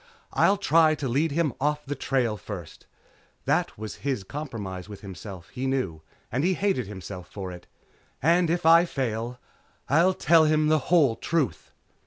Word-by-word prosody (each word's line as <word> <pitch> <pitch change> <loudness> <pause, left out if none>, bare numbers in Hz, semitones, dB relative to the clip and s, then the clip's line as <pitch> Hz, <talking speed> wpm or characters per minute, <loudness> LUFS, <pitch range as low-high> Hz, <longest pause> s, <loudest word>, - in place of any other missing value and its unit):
I'll 200 - +4
try 160 -5 +4
to 145 -2 -3
lead 145 +6 +1
him 155 -2 +1
off 150 +1 0
the 140 - -3
trail 130 -5 0
first 95 -6 -9 0.3
" - - -36
that - - 0
was 110 0 -6
his 135 -7 -2
compromise 105 -8 -6
with 105 - -9
himself, 95 -2 -9
he 130 +2 -4
knew, 125 -13 -1 0.3
and 130 +5 0
he 185 +2 +2
hated 190 - 0
himself 95 -3 -8
for 95 -3 -6
it 90 0 -11 0.5
"and 170 +3 +3
if 175 0 0
I 165 +1 +7
fail 120 -5 -3 0.5
I'll 170 +6 +4
tell 160 -1 +5
him 155 0 +3
the 155 0 +4
whole 150 -9 +4
truth." 150 +2 -2
135 Hz, 170 wpm, -26 LUFS, 105-160 Hz, 0.5 s, I